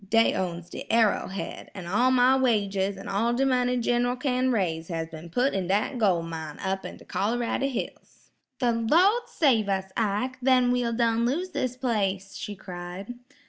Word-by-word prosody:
Dey 225 +1 +4
owns 175 -1 -4
de - - -6
Arrow 225 -2 +3
Head, 195 +1 -6
an' 185 -3 -7
all 210 +9 +2
my 255 0 +5
wages 200 -6 +1
an' 195 - -9
all 225 +4 +1
de 265 +3 +1
money, 250 -1 +2
Gin'ral 245 +1 +1
kin 255 -1 0
raise 165 -7 -1
has 165 -2 -4
ben 160 +1 -10
put 250 +10 +1
in 190 -2 -1
dat 210 +7 0
gol' 185 -6 +2
mine 160 -2 -6
up 190 0 -2
in - - -7
de - - -16
Col'rady 240 +5 -1
hills." 250 - -7 0.3
"The 245 -1 +2
Lawd 340 - +3
save 235 - +2
us, 190 -1 -1
Ike! 230 +4 -1
Then 255 -1 +4
we'll 245 -1 0
done 230 0 +1
lose 350 +9 -2
this 250 -6 -2
place,' 195 -6 -1
she 205 - -6
cried. 180 +3 -7
225 Hz, 180 wpm, -26 LUFS, 190-250 Hz, 0.3 s, my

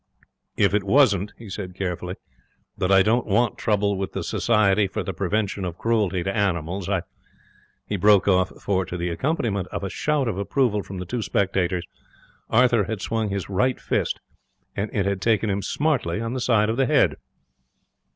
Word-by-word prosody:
'If 100 - +3
it 105 -1 +2
wasn't,' 100 -3 +3
he 115 - -11
said, 95 -2 -6
carefully, 90 -1 -3 0.6
'that 95 -1 -1
I 95 -1 +6
don't 115 +4 +1
want 110 +3 +1
trouble 100 -1 +1
with 95 - -3
the - - -3
Society 105 -3 +2
for 105 +2 -4
the 95 - -4
Prevention 100 +2 -1
of 90 -2 -4
Cruelty 105 -6 0
to 95 +1 -2
Animals, 95 -2 -1
I'd 95 -4 0 0.5
' - - -35
He 105 - -2
broke 100 +1 +5
off, 95 -1 +3
for, 95 -2 0
to 90 0 -6
the 85 0 -2
accompaniment 100 - -1
of - - -5
a 95 - -3
shout 150 -4 0
of 100 -4 -2
approval 105 0 +1
from 95 -1 -8
the 90 - -5
two 120 +6 -3
spectators, 95 -4 0 0.6
Arthur 120 -3 +4
had 110 0 -4
swung 110 0 -1
his 100 -2 -3
right 120 +7 0
fist, - - -1 0.6
and 105 +2 -2
it 100 -3 0
had 100 -1 -1
taken 110 -1 +2
him 100 +1 -1
smartly 130 - 0
on 115 +1 -3
the 130 - -3
side 110 -3 +3
of 115 - -3
the 135 -1 +2
head. - - +3
100 Hz, 190 wpm, -24 LUFS, 95-110 Hz, 0.6 s, I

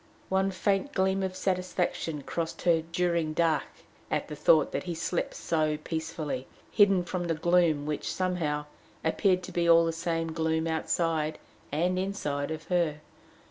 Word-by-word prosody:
One 190 +1 +2
faint 195 +8 0
gleam 190 -2 +1
of 190 -1 -2
satisfaction 180 -5 -1
crossed 165 +2 -4
her 170 -2 +4
"during 170 -2 +1
dark" 160 -2 +2 0.4
at - - -1
the 150 - -5
thought 150 0 +4
that - - -3
he 175 -2 -3
slept 170 +2 -2
so 155 -2 0
peacefully, 160 -4 -4 0.2
hidden 195 -4 +5
from 175 0 -3
the 165 -1 0
gloom 165 -3 +3
which, 150 0 -2
somehow, 165 -5 -1 0.4
appeared 185 +2 +2
to - - -7
be 170 -1 +1
all 165 0 +7
the 165 - 0
same 165 0 -2
gloom 160 0 0
outside 160 -1 0 0.3
and 175 +5 +1
inside 150 -7 -2
of 160 0 -5
her. 170 -4 +1
165 Hz, 155 wpm, -29 LUFS, 155-180 Hz, 0.4 s, all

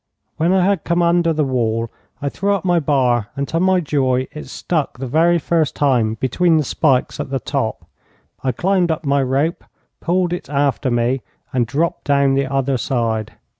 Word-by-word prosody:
When 165 +3 +2
I 185 -1 +3
had 195 -4 +1
come 170 0 +1
under 170 0 +3
the 155 -1 +1
wall 115 -4 -1 0.3
I 140 - 0
threw 200 +7 0
up 195 - -5
my 175 -2 +3
bar, 125 -7 +1
and 140 0 -2
to 165 - 0
my 185 +1 +3
joy 130 -4 0
it 150 - -8
stuck 155 -7 -2
the 130 - -5
very 165 +6 +3
first 160 -1 0
time 120 -6 +2
between 160 +8 +2
the 155 - +2
spikes 135 -2 +1
at - - -4
the 135 0 -1
top. - - -3 0.6
I 130 - +1
climbed 180 - +1
up 160 0 -2
my 140 0 +2
rope, 135 +6 0 0.4
pulled 175 0 0
it 175 - -6
after 140 -1 0
me, 120 +2 0 0.3
and 120 -3 +1
dropped 155 +7 -1
down 140 -1 +3
on - - +2
the 135 0 0
other 135 -1 0
side. 115 -3 -1
140 Hz, 195 wpm, -19 LUFS, 130-170 Hz, 0.6 s, I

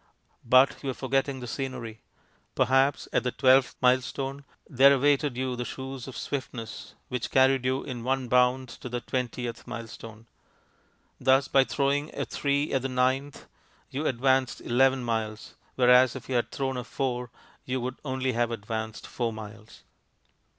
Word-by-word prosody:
But 130 +3 +4
you 140 - -3
are - - -1
forgetting 135 0 -1
the 125 - -6
scenery. 125 -4 -5 0.5
Perhaps 135 +2 +2
at - - +3
the 125 - -1
twelfth 130 +1 +4
milestone 135 +2 +1 0.2
there 135 -1 +6
awaited 140 -1 +2
you 130 -1 -1
the 125 - -3
shoes 130 +1 -7
of 130 - -8
swiftness, 125 -5 -6
which 125 -2 -3
carried 130 -1 +3
you 130 +1 0
in 125 -4 -6
one 130 0 -1
bound 125 +1 +3
to 120 +1 -9
the 120 0 -2
twentieth 125 -2 -4
milestone; 115 -2 -8 0.9
thus 135 +1 +3
by 135 -1 +4
throwing 145 +2 0
a - - -1
three 140 +1 -1
at 135 - +2
the 135 - -3
ninth, 130 +2 0 0.5
you 145 +4 -2
advanced 130 +1 +1
eleven 130 +1 +2
miles, 110 -2 -3 0.2
whereas 125 0 +5
if 130 - -8
you 130 - -3
had 120 -1 +1
thrown 130 -1 -2
a 125 - -3
four 125 0 -3 0.4
you 130 0 -2
would 125 +1 -4
only 130 -2 -1
have 120 -1 0
advanced 110 -1 -5
four 120 -2 -2
miles. 110 0 -11
130 Hz, 155 wpm, -27 LUFS, 120-135 Hz, 0.9 s, there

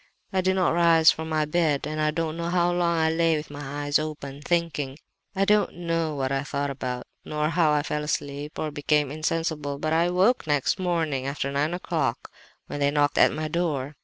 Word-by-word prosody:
"I 190 - +2
did 190 +1 +1
not 185 -3 +2
rise 165 -2 +6
from 160 0 -5
my 155 -1 +1
bed, 150 -3 +1
and 155 +1 -3
I 155 - +2
don't 160 0 -2
know 170 0 -3
how 175 0 +2
long 175 -1 +1
I 160 0 +2
lay 165 0 +2
with 150 -1 -7
my 145 0 -5
eyes 145 0 +2
open, 145 -2 -6
thinking. 150 -4 -1 0.4
I 195 +1 +2
don't 210 +1 +2
know 165 -2 -1
what 135 -1 -1
I 135 0 0
thought 140 0 -2
about, 125 -2 -4 0.2
nor 150 0 -1
how 165 -2 +3
I 150 -1 +2
fell 150 0 -2
asleep 145 0 -4
or 155 - -2
became 145 -1 +1
insensible; 155 -2 -2
but 155 +2 -1
I 165 +1 +3
awoke 180 +4 +2
next 145 +4 +1
morning 160 -7 -1
after 140 0 -2
nine 150 +5 0
o'clock 180 - -2 0.3
when 145 - -6
they 140 0 +3
knocked 145 0 +1
at - - +6
my 155 +1 -3
door. 150 -4 -2
155 Hz, 210 wpm, -25 LUFS, 145-170 Hz, 0.4 s, rise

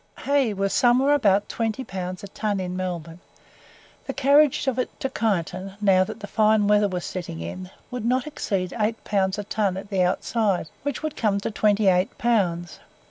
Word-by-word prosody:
Hay 280 -5 +2
was 195 -1 -1
somewhere 255 +4 +4
about 205 -8 +3
20 230 +2 -2
pounds 185 -3 -6
a - - -6
ton 205 -1 -2
in 180 -1 -4
Melbourne. 175 -3 -4 0.9
The - - -2
carriage 280 +1 +4
of 260 -2 0
it 255 - -3
to 270 - -2
Kyneton, 190 -3 -2
now 195 -3 +4
that - - -7
the - - -5
fine 215 0 +3
weather 210 0 +4
was 180 -2 -4
setting 175 -3 -5
in, 185 0 -6 0.2
would 250 -3 -4
not 250 +2 +1
exceed 195 - -3
8 220 0 -1
pounds 190 -1 0
a 205 - -3
ton 200 -2 -1
at 200 +2 -8
the 190 -2 +1
outside, 190 0 0
which 285 0 -4
would 310 -1 -3
come 205 -3 +1
to - - -3
28 200 -3 +2
pounds. 180 -7 0
205 Hz, 185 wpm, -24 LUFS, 185-230 Hz, 0.9 s, somewhere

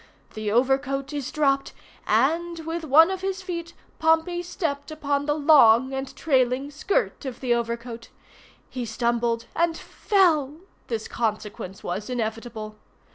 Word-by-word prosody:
The 215 -1 -3
overcoat 270 +4 +1
is 285 -2 -4
dropped, 275 -3 +1 0.3
and, 330 +10 +1
with 325 +1 -4
one 320 +4 +6
of 380 -1 -4
his 385 0 -3
feet, 340 -2 -5 0.2
Pompey 325 +2 +2
stepped 320 -5 -3
upon 285 -2 -2
the 295 - +2
long 270 -4 +5
and 270 0 -5
trailing 265 -1 +1
skirt 390 - -1
of 260 -3 -6
the 250 -2 +1
overcoat. 235 0 -4 0.6
He 255 -2 -5
stumbled 235 0 -1
and 330 -1 +1
fell—this 310 - 0
consequence 210 -4 -4
was 205 +6 -4
inevitable. 225 -2 -4
275 Hz, 130 wpm, -25 LUFS, 235-320 Hz, 0.6 s, one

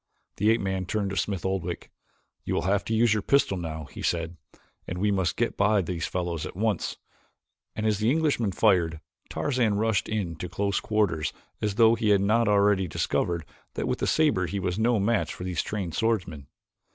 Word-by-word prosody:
The 105 - +3
ape 115 - +3
man 95 -1 -2
turned 100 -1 -1
to - - -3
Smith 95 -2 -2
Oldwick. 90 -2 -3 0.5
"You - - -2
will - - 0
have 100 +2 +1
to 115 - -1
use 115 -1 +4
your 105 - 0
pistol 140 -3 +2
now," 80 -3 -5
he 70 - -10
said, 85 0 -1 0.5
"and 90 - -4
we 105 +3 +1
must 95 -5 0
get - - 0
by 105 -1 +3
these 85 -1 -3
fellows 85 -3 -3
at - - -6
once;" 105 +2 -1 0.8
and 110 - -2
as 105 -2 +1
the 110 - +1
young 130 - +4
Englishman 145 -10 +1
fired, 90 -6 +2 0.3
Tarzan 125 -7 0
rushed 110 -1 0
in 95 -7 -2
to 90 +2 -5
close 100 +2 0
quarters 100 -8 0 0.3
as 105 -2 -1
though 115 0 +6
he 115 -2 0
had 100 -2 +5
not 115 +4 +2
already 100 -2 +3
discovered 85 0 -1 0.3
that - - -2
with - - -1
the - - 0
saber 150 - +2
he 100 +4 -3
was 90 +1 -2
no 115 0 +3
match 105 +2 0
for - - -7
these 90 -2 -1
trained 95 -6 -4
swordsmen. 90 -10 -1
100 Hz, 200 wpm, -27 LUFS, 90-110 Hz, 0.8 s, though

